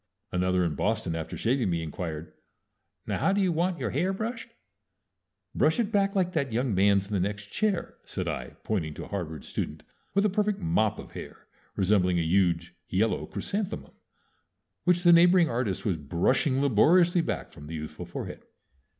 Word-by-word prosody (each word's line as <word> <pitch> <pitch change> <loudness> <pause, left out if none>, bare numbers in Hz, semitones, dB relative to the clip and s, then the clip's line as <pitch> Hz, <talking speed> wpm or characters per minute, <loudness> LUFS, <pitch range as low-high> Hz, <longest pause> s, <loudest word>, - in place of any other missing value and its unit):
Another 90 0 +1
in 80 - 0
Boston, 80 - -1
after 80 -1 -5
shaving 120 -2 +1
me, 85 -1 -1
inquired, 80 0 -5 0.7
"Now - - -2
how 195 - +2
do 200 - +1
you 190 -3 +3
want 170 +2 0
your - - -2
hair 185 +2 +1
brushed?" 225 +4 -4 1.0
"Brush 160 +8 +2
it 225 -2 0
back 200 -1 +2
like 185 -2 +2
that 140 -5 0
young 120 0 0
man's 100 +1 +4
in 105 - -7
the 100 - +2
next 100 +2 -3
chair," 210 -4 -1
said - - -4
I, - - -4
pointing 80 -8 -2
to - - -6
a - - -13
Harvard 80 -7 -5
student - - -4 0.3
with 200 +1 +4
a - - +6
perfect 210 +1 +1
mop 165 - +1
of - - -10
hair, - - -9 0.3
resembling 90 -2 +2
a 85 - +2
huge 85 -1 +1 0.2
yellow 105 +4 +1
chrysanthemum, 205 0 -4 0.9
which 180 -1 +3
the 175 -1 +7
neighboring 175 0 +6
artist 115 -5 -2
was 95 -6 +1
brushing 90 - +1
laboriously 170 - +5
back 165 - -3
from 75 - -12
the 80 - -6
youthful 75 -1 -6
forehead. - - -6
115 Hz, 175 wpm, -28 LUFS, -, 1.0 s, the